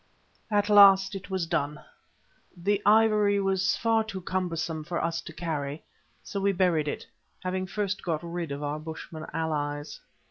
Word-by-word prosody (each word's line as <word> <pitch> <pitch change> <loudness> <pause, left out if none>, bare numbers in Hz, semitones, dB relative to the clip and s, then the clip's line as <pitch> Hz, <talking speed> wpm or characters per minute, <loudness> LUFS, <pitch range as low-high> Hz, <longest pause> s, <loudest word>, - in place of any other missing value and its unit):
At 205 -1 +2
last 195 -1 +7
it 195 0 -7
was 190 -3 -1
done. 150 -3 -1 0.8
The 200 +3 0
ivory 210 -1 +5
was 190 -1 +1
far 225 -1 +2
too 195 -4 -6
cumbersome 165 -4 -2
for 170 +2 -3
us 165 -1 -1
to - - -9
carry, 155 -3 -4 0.4
so 200 - -4
we 200 0 +2
buried 175 -5 +2
it, - - -4 0.4
having 185 0 -2
first 200 0 -2
got 165 -2 -2
rid 170 -2 -4
of 140 +1 -4
our 145 +1 -2
bushmen 160 0 -8
allies. 145 -2 -3
180 Hz, 155 wpm, -27 LUFS, 160-200 Hz, 0.8 s, last